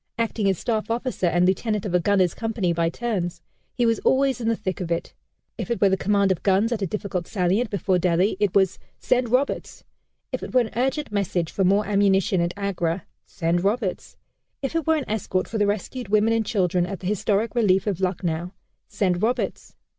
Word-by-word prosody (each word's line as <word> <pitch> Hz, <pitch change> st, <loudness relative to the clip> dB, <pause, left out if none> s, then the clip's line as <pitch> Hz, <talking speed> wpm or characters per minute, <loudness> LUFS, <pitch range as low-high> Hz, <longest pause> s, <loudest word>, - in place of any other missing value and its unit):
Acting 225 Hz, -3 st, 0 dB
as 190 Hz, -, +1 dB
staff 220 Hz, +2 st, -2 dB
officer 235 Hz, -5 st, -1 dB
and 175 Hz, +1 st, +3 dB
lieutenant 210 Hz, +3 st, 0 dB
of 190 Hz, -, -3 dB
a 180 Hz, -, +4 dB
gunners' 185 Hz, -1 st, +2 dB
company 220 Hz, -6 st, -1 dB
by 165 Hz, 0 st, +1 dB
turns, 185 Hz, -4 st, -3 dB, 0.4 s
he 245 Hz, -, +2 dB
was 230 Hz, -1 st, +2 dB
always 265 Hz, -1 st, +2 dB
in 225 Hz, -, -2 dB
the 230 Hz, -, +2 dB
thick 190 Hz, -4 st, -4 dB
of 170 Hz, -2 st, -4 dB
it. 170 Hz, -, -2 dB, 0.5 s
If -, -, -4 dB
it 235 Hz, -, -1 dB
were 200 Hz, -, +5 dB
the 190 Hz, -, +3 dB
command 200 Hz, 0 st, +2 dB
of 185 Hz, -, -1 dB
guns 200 Hz, +4 st, +2 dB
at 225 Hz, -3 st, -1 dB
a 195 Hz, -, 0 dB
difficult 185 Hz, -2 st, -3 dB
salient 200 Hz, +4 st, +1 dB
before 190 Hz, -2 st, +1 dB
Delhi, 180 Hz, +3 st, +2 dB
it 205 Hz, -3 st, +1 dB
was 190 Hz, -2 st, +3 dB, 0.2 s
"Send 250 Hz, -1 st, +1 dB
Roberts." 255 Hz, +4 st, -1 dB, 0.5 s
If -, -, -3 dB
it -, -, -7 dB
were 250 Hz, -, +7 dB
an 225 Hz, -, -3 dB
urgent 265 Hz, +4 st, -1 dB
message 185 Hz, -5 st, -1 dB
for 195 Hz, -, 0 dB
more 200 Hz, +3 st, +3 dB
ammunition, 195 Hz, -2 st, +2 dB
at 170 Hz, 0 st, 0 dB
Agra, 185 Hz, -3 st, -2 dB, 0.2 s
"Send 170 Hz, +1 st, -1 dB
Roberts." 205 Hz, -1 st, -2 dB, 0.5 s
If 270 Hz, +4 st, -3 dB
it 330 Hz, -2 st, -1 dB
were 320 Hz, -, +4 dB
an 290 Hz, -, -3 dB
escort 190 Hz, -3 st, -1 dB
for 220 Hz, -, -3 dB
the 205 Hz, -, +3 dB
rescued 215 Hz, +3 st, -3 dB
women 215 Hz, +2 st, +3 dB
and 225 Hz, -1 st, +1 dB
children 180 Hz, -4 st, +1 dB
at 195 Hz, -1 st, -6 dB
the -, -, -8 dB
historic 210 Hz, +3 st, 0 dB
relief 195 Hz, -6 st, +3 dB
of 195 Hz, -3 st, -2 dB
Lucknow, 175 Hz, -1 st, -2 dB, 0.3 s
"Send 190 Hz, -4 st, 0 dB
Roberts." 235 Hz, +3 st, -2 dB
200 Hz, 205 wpm, -24 LUFS, 180-225 Hz, 0.5 s, were